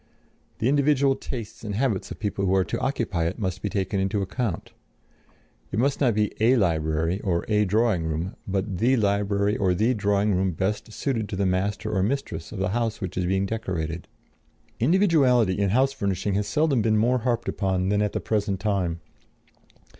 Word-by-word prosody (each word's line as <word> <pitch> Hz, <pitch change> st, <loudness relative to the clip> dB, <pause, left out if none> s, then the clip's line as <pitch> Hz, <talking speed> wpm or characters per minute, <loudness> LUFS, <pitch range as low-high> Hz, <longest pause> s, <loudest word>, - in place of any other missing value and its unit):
The 115 Hz, -, 0 dB
individual 140 Hz, -1 st, +3 dB
tastes 120 Hz, -6 st, -7 dB
and 105 Hz, -2 st, -4 dB
habits 115 Hz, -5 st, 0 dB
of -, -, -7 dB
the -, -, -32 dB
people 100 Hz, -1 st, -1 dB
who 95 Hz, -, +3 dB
are 95 Hz, -, +3 dB
to -, -, -3 dB
occupy 115 Hz, -11 st, -1 dB
it 85 Hz, +4 st, -2 dB
must 95 Hz, -4 st, -3 dB
be 105 Hz, -, -2 dB
taken 95 Hz, 0 st, -1 dB
into 95 Hz, +1 st, 0 dB
account; 100 Hz, -1 st, -3 dB, 1.0 s
it 95 Hz, -, -3 dB
must 135 Hz, +4 st, +1 dB
be -, -, +1 dB
not 115 Hz, -4 st, +2 dB, 0.2 s
"a 120 Hz, +4 st, +5 dB
library," 80 Hz, -2 st, 0 dB
or 85 Hz, -4 st, -1 dB
"a 105 Hz, -1 st, +2 dB
drawing 105 Hz, -3 st, +1 dB
room," 80 Hz, +4 st, -3 dB
but 95 Hz, -1 st, -2 dB
the 130 Hz, +4 st, +3 dB
library 100 Hz, -1 st, +1 dB
or 95 Hz, -2 st, +2 dB
the 110 Hz, +7 st, +2 dB
drawing 100 Hz, -1 st, +1 dB
room 95 Hz, 0 st, +1 dB
best 100 Hz, +6 st, -2 dB
suited 115 Hz, -3 st, -2 dB
to -, -, -4 dB
the 100 Hz, +1 st, 0 dB
master 100 Hz, +4 st, -1 dB
or 95 Hz, -, +2 dB
mistress 95 Hz, -8 st, -2 dB
of 110 Hz, -, -7 dB
the 95 Hz, -1 st, 0 dB
house 115 Hz, +1 st, -1 dB
which 95 Hz, -3 st, -5 dB
is 90 Hz, -1 st, -1 dB
being 95 Hz, +1 st, +1 dB
decorated. 90 Hz, -6 st, -3 dB, 0.7 s
Individuality 130 Hz, -, +3 dB
in 100 Hz, -1 st, +2 dB
house 130 Hz, +6 st, +2 dB
furnishing 100 Hz, -3 st, -1 dB
has 100 Hz, +1 st, 0 dB
seldom 140 Hz, +2 st, +2 dB
been 110 Hz, 0 st, +2 dB
more 125 Hz, +4 st, +2 dB
harped 120 Hz, 0 st, -1 dB
upon 95 Hz, -2 st, 0 dB
than 105 Hz, 0 st, +2 dB
at 105 Hz, -1 st, 0 dB
the -, -, -1 dB
present 105 Hz, -3 st, -1 dB
time. 95 Hz, -5 st, -1 dB
100 Hz, 190 wpm, -25 LUFS, 95-115 Hz, 1.0 s, a